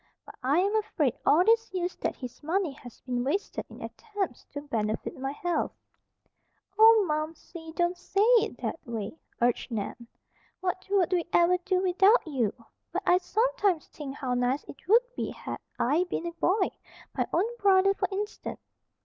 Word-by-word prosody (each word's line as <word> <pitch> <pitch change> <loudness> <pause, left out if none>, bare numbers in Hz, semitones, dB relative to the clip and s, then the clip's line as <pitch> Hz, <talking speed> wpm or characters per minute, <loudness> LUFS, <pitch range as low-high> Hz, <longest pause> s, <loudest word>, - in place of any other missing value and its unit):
But - - -11
I 275 +4 +2
am 395 +4 +2
afraid 310 - 0
all 345 +4 +6
these 455 0 +3
years 365 -1 -2
that - - -2
his 250 -2 -9
money 335 +2 0
has 245 -3 -13
been 245 -1 -2
wasted 310 +10 -2
in - - -10
attempts 410 - -5
to 285 - -7
benefit 220 -6 -2
my 270 +1 -3
health." 345 +4 -1 1.1
"Oh, 445 -2 +8
Momsey! 320 +2 -4
Don't 345 +1 +1
say 390 +3 0 0.2
it, - - -4
that - - -2
way," 225 +1 -5 0.3
urged 240 -1 +1
Nan. 230 +1 -4 0.5
"What 370 0 -3
would 385 -2 +2
we 350 -2 +2
ever 345 +1 +4
do 370 0 0
without 385 +5 +4
you? 255 -10 0 0.4
But 375 +4 -2
I 355 +1 +5
sometimes 420 -4 +1
think 280 -3 -7
how 260 -3 -2
nice 250 +3 +1
it 280 - -13
would 460 +5 +6
be - - -2
had - - -6 0.2
I 305 +9 +2
been 350 - -3
a 340 - -2
boy, 370 +4 +1 0.4
my - - 0
own 355 +5 +2
brother, 390 -2 +5
for - - -1
instance. 415 +2 -4
350 Hz, 170 wpm, -28 LUFS, 275-390 Hz, 1.1 s, Oh